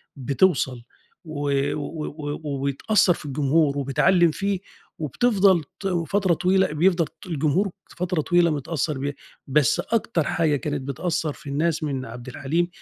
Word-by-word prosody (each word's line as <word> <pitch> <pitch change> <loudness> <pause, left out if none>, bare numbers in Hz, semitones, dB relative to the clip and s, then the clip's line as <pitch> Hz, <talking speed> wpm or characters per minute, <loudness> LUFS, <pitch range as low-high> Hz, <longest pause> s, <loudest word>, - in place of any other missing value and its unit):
بتوصَل 135 -2 +1 0.4
و 145 -3 -3 0.2
و 150 +1 -4
و 145 0 -5 0.2
وبتأثّر 175 +8 +2
في 155 - -10
الجمهور 145 +1 +1
وبتعلِّم 165 +5 +3
فيه، 195 +3 -1 0.4
وبتفضل 190 - +3 0.2
ت 195 - -9
و 175 -3 0
فترة 195 -2 +2
طويلة 190 +3 +2
بيفضل 170 +1 +3
ط - - -15
الجمهور 165 +4 +1 0.3
فترة 180 -2 0
طويلة 175 +1 +3
متأثّر 150 0 -2
بيها، 140 +2 -2 0.3
بس 140 -1 +3
أكتر 225 -7 0
حاجة 155 -1 +1
كانت 145 0 -3
بتأثّر 155 +3 -2
في 140 - -11
الناس 155 +3 0
من 135 -3 -2
عبدالحليم 135 +8 -2
155 Hz, 140 wpm, -24 LUFS, 140-180 Hz, 0.4 s, وبتعلِّم